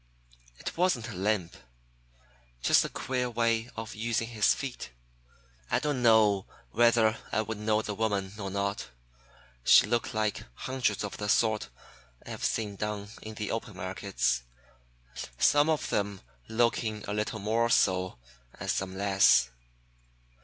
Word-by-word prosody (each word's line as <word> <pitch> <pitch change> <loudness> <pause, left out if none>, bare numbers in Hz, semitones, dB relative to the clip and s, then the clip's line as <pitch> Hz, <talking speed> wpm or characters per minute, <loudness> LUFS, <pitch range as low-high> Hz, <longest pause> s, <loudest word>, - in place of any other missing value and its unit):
It - - -6
wasn't 165 -10 +1
a - - -7
limp; 95 -2 -1 1.1
just - - +5
a - - -4
queer 125 -1 -2
way 115 0 0
of 110 0 -6
using 115 +1 -1
his 110 -3 +3
feet. 135 - -4 0.8
I - - +2
don't 145 -4 -1
know 110 -4 +4 0.2
whether 115 -1 +4
I 110 - +1
would 110 -1 -5
know 110 0 +1
the 105 - -3
woman 100 -2 -1
or 95 -2 -3
not. 100 -7 -2 0.7
She - - +7
looked 115 0 -1
like 110 -1 -1
hundreds 130 -6 -1
of 105 - -5
the 105 0 -3
sort 110 - +2 0.6
I - - -8
have - - -6
seen 105 -3 -1
down 105 -1 -4
in 110 0 -8
the 105 -1 -3
open 115 -2 -4
markets, 95 -7 -1 1.0
some 145 - +4
of 155 -2 0
them 100 -1 -1 0.3
looking 110 -2 0
a 100 - -2
little 105 +1 -2
more 110 +3 +1
so 95 - +2 0.4
and - - -1
some 95 0 -3
less." 95 -12 +4
110 Hz, 145 wpm, -29 LUFS, 100-115 Hz, 1.1 s, She